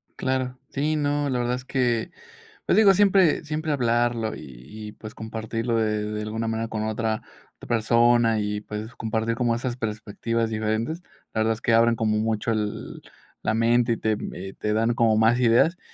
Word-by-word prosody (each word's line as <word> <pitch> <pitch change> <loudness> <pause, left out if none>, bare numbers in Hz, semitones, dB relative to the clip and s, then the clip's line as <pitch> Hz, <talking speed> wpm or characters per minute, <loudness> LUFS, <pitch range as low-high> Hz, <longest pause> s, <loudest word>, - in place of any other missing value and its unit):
Claro. 130 -1 -2
Sí, 150 +3 -1
no, 145 -1 0
la 125 - 0
verdad 120 +1 0
es 125 - -8
que, 125 -4 0 0.6
pues, - - +3
digo, 210 -2 +7
siempre 190 -5 +4
siempre 155 +1 -2
hablarlo 120 -3 +1
y - - -9 0.5
y, - - -9
pues, 110 0 -10
compartirlo 115 +1 -3
de 110 -1 0
de 105 0 -3
alguna 110 +1 -3
manera 115 0 -2
con 110 -1 -3
otra 110 0 -1 0.3
otra - - -13
persona 115 0 +3
y, 105 0 -2
pues, 105 +2 -7
compartir 115 +1 -2
como 120 -1 +1
esas 120 +1 -3
perspectivas 110 0 -2
diferentes. 110 +9 -2 0.3
La 110 - -1
verdad 110 +1 +2
es 110 - -12
que 115 - +2
abren 115 +1 +5
como 110 -1 +1
mucho 110 +1 -1
el 105 -2 -3 0.4
la 110 - 0
mente 115 +1 +3
y 115 - 0
te 110 -1 0
mm - - -6
eh, 95 +1 -7
te 105 - -1
dan 115 +2 +2
como 115 -2 +3
más 115 +3 +4
ideas. 125 +9 +4
115 Hz, 190 wpm, -25 LUFS, 110-125 Hz, 0.6 s, digo